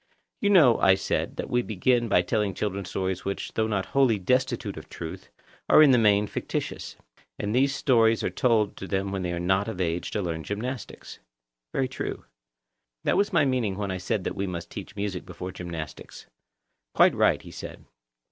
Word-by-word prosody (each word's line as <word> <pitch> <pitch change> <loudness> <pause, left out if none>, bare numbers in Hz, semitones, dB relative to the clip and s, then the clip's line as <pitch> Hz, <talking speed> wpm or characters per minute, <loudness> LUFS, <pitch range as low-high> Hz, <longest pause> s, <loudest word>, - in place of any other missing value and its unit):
You 205 - +1
know, 155 - +6
I 95 0 +5
said, 95 - -2
that - - -4
we 125 - +1
begin 120 +3 +1
by 90 - +4
telling 100 +1 -1
children 100 -2 -3
stories 95 +1 -3
which, 100 - -4
though 110 0 +1
not 100 -3 -1
wholly 130 -5 +3
destitute 125 +8 0
of - - -10
truth, - - -8 0.4
are 155 - +8
in 145 - +7
the 125 - +5
main 105 -2 +4
fictitious; - - -4 0.4
and 105 +1 -2
these 135 +3 +2
stories 115 -5 +3
are - - -1
told 110 -5 +2
them 95 0 -2
when 95 -1 -2
they 90 -1 -2
are 85 - -3
not 95 +4 +1
of 110 -5 -5
an 90 - +2
age 85 +1 -2
to 105 - -2
learn 80 -2 -3
gymnastics. 120 +6 -6 0.5
Very 135 - 0
true. 130 - -5 0.8
That - - +2
was 205 - +2
my 160 -6 +4
meaning 125 -7 0
when 100 -2 -2
I 95 - -3
said 100 +1 -2
that - - -2
we 100 - -2
must 85 -2 -6
teach 105 +2 -8
music 100 -3 -3
before 90 +1 -7
gymnastics. 85 -5 -8 0.7
Quite - - +6
right, - - +3
he - - -11
said. - - -9
100 Hz, 195 wpm, -26 LUFS, 95-120 Hz, 0.8 s, are